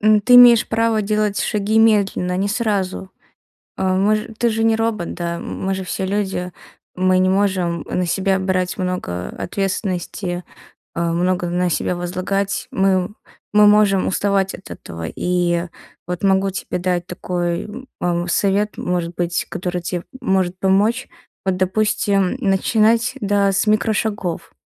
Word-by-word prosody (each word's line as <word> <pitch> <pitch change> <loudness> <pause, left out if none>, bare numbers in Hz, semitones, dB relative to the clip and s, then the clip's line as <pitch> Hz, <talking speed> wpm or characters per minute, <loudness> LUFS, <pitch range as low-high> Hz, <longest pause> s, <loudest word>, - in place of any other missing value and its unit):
м, 215 0 +4
ты 245 +5 +4
имеешь 245 -2 +8
право 225 -1 +1
делать 210 0 0
шаги 210 +1 0
медленно, 200 -5 +2
не 195 +2 0
сразу. 200 -4 -2 0.7
А, 185 0 +1
мож 210 +3 +2 0.2
ты 240 -1 +3
же 225 0 -1
не 225 0 +3
робот, 225 -6 -2
да? 170 -1 -3
М 170 - -6
мы 195 - 0
же 190 - -4
все 190 +1 -3
люди. 190 -2 -2 0.4
Мы 185 0 +2
не 185 0 +3
можем 185 -4 0
на 180 0 0
себя 190 +2 0
брать 185 -1 -1
много 180 - -3
ответственности, 185 -2 -3 0.5
а, 170 0 -1
много 175 +1 0
на 180 +1 0
себя 175 +2 -1
возлагать. 185 +3 -2
Мы 190 -1 +1 0.4
мы 210 0 +6
можем 205 -2 +4
уставать 195 0 0
от 190 - -11
этого. 80 0 -7
И 175 -1 0 0.4
вот 180 +1 -4
могу 195 0 +3
тебе 190 - -4
дать 180 -1 -1
такой, 175 -1 -2
м, 250 +5 -9
ам, 175 0 0
совет, 200 +4 +1
может 175 -1 -2
быть, 175 0 -1
который 180 -1 -3
те 175 0 -4 0.2
может 185 -1 0
помочь. 205 +6 +2 0.4
Вот, 190 -1 +1
допустим, 200 +1 +1
начинать, 225 +3 +2
да, 200 -1 +2
с 195 - +1
микрошагов. 210 -4 -1
190 Hz, 150 wpm, -20 LUFS, 180-210 Hz, 0.7 s, имеешь